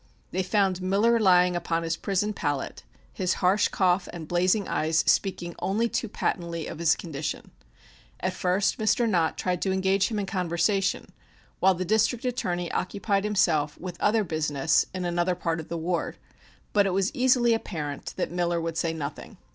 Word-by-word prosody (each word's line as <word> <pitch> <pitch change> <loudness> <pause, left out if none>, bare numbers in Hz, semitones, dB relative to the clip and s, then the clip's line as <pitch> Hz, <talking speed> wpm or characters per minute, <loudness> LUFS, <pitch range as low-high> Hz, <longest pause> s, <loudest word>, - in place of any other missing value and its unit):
They 185 - 0
found 190 -1 +1
Miller 205 +5 +3
lying 180 -3 +4
upon 165 -1 -1
his 165 0 -1
prison 200 +4 -1
pallet, 145 -7 -3 0.3
his 185 0 0
harsh 190 +3 +3
cough 180 -1 +1
and 165 -3 -8
blazing 185 +4 +1
eyes 160 +1 +1
speaking 180 -3 +1
only 220 +4 0
too 235 -1 -2
patently 170 -4 -2
of - - -7
his 165 -3 +3
condition. 155 -3 -5 0.7
At - - -1
first 185 +4 0
Mr. 220 +2 +2
Nott 170 -6 +1
tried 180 -1 -1
to 190 - 0
engage 190 +1 +2
him 220 - -3
in 205 - -1
conversation 185 +1 0 0.5
while 190 0 +4
the 185 +1 -3
District 220 +5 +1
Attorney 180 -8 -2
occupied 200 +2 -1
himself 160 -8 +1
with 180 -1 -7
other 215 +1 +3
business 155 -3 +1
in 185 -1 -4
another 175 +1 0
part 165 -2 -2
of 160 - -8
the 170 - -3
ward, 170 +1 -2 0.6
but 205 -1 +4
it 190 - -1
was 195 +1 0
easily 245 -2 +3
apparent 155 -10 -4
that - - -2
Miller 175 -1 0
would 165 0 -3
say 165 -1 0
nothing. 150 -2 -7
180 Hz, 170 wpm, -26 LUFS, 170-200 Hz, 0.7 s, lying